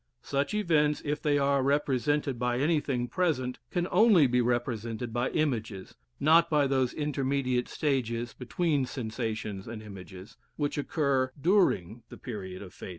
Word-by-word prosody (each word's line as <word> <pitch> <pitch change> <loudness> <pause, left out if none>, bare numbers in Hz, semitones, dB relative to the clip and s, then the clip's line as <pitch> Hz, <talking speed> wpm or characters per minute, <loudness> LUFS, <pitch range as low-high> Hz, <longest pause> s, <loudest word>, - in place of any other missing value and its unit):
Such 140 +7 -1
events, 155 -7 +2
if 150 0 -2
they 145 -1 +2
are 140 -1 +2
represented 140 -1 0
by 120 0 0
anything 140 -4 0
present, 130 -7 -1
can 175 -1 -1
only 200 -5 +6
be 125 -1 +2
represented 120 -1 -2
by 120 +2 0
images, 110 -11 -2 0.3
not 165 +3 +5
by 150 -2 +3
those 130 -2 +1
intermediate 135 -4 -1
stages, 120 -5 -1
between 140 +1 -1
sensations 110 -5 -4
and 115 -1 -6
images, 95 -1 -11 0.2
which 145 -1 -2
occur 140 -3 0
during 135 - +2
the - - -10
period 95 -6 -7
of 95 - -12
fading. - - -9
130 Hz, 145 wpm, -29 LUFS, 120-150 Hz, 0.3 s, only